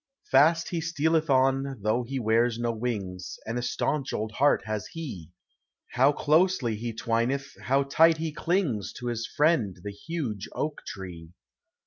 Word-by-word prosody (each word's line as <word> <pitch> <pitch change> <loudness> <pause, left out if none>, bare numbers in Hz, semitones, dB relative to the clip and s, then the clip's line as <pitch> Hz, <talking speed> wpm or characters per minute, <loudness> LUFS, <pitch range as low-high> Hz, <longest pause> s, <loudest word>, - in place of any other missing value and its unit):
Fast 160 +5 +5
he 170 -2 -2
stealeth 160 0 +1
on, 135 0 +2
though 110 +3 +2
he 130 +3 -4
wears 115 +1 +2
DO 120 0 0
win 110 -5 -3 0.3
And 115 +2 -2
a - - -2
staunch 135 +3 -1
old 110 +1 -2
heart 140 +6 +3
has 110 -1 -3
he! 115 - -7 0.6
How 135 +4 +4
closely 150 - +2
he 115 +2 -4
twineth, 120 +4 -1
how 135 +2 +3
tight 160 +4 +4
he 160 -1 -3
clingfl 155 - -1
To 125 - -6
his 115 -1 -3
friend, 150 - +2
the 105 - -4
huge 115 - -5
oak 150 -1 -3 0.2
live! 85 -4 -8
130 Hz, 155 wpm, -27 LUFS, 110-155 Hz, 0.6 s, Fast